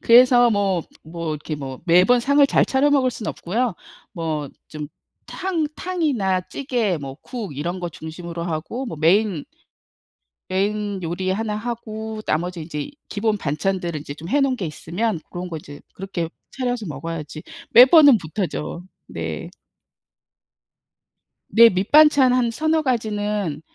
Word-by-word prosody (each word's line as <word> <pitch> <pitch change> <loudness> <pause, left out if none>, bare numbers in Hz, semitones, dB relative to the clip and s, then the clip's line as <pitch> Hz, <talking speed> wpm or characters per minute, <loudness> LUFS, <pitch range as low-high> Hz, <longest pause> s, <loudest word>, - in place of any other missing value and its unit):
그래서 245 0 +6
뭐 195 -5 +1 0.2
뭐 165 0 -5
이렇게 150 0 -4
뭐 135 -2 -7
매번 185 +8 +5
상을 280 +3 +4
잘 - - +3
차려 275 +2 +2
먹을 265 -3 +3
순 220 -2 -7
없고요. 225 +3 -1 0.4
뭐 155 -4 -3 0.2
좀 150 -1 -7 0.4
탕 360 -5 -1
탕이나 275 - 0
찌개 240 -9 -1
뭐 135 -1 -7
국 215 - -6
이런 175 +5 -3
거 175 - -3
중심으로 170 +1 -7
하고 175 +11 -4
뭐 165 - -6
메인 180 +1 +2 1.1
메인 200 +1 -1
요리 175 +3 -2
1 215 +1 -2
하고 220 -1 -5
나머지 175 +2 -1
인제 150 -2 -5
이 - - -7 0.2
기본 210 0 0
반찬들을 175 +1 -2
이제 145 0 -7
좀 165 +4 -9
해 290 - +3
놓은 270 -2 +2
게 195 -8 -4
있으면 170 +6 -2
고런 180 0 -6
거 165 - -4
이제 145 -1 -11
그렇게 185 -4 -4 0.2
차려서 245 -4 -2
먹어야지 155 +1 -6 0.3
매번은 270 +2 +8
못하죠. 170 0 -4 0.2
네. - - -5 2.0
네. 230 0 +8
밑반찬 265 +7 +5
한 245 -2 +2
3-4 315 +5 +1
가지는 210 - -1
195 Hz, 260 characters per minute, -22 LUFS, 165-245 Hz, 2.0 s, 매번은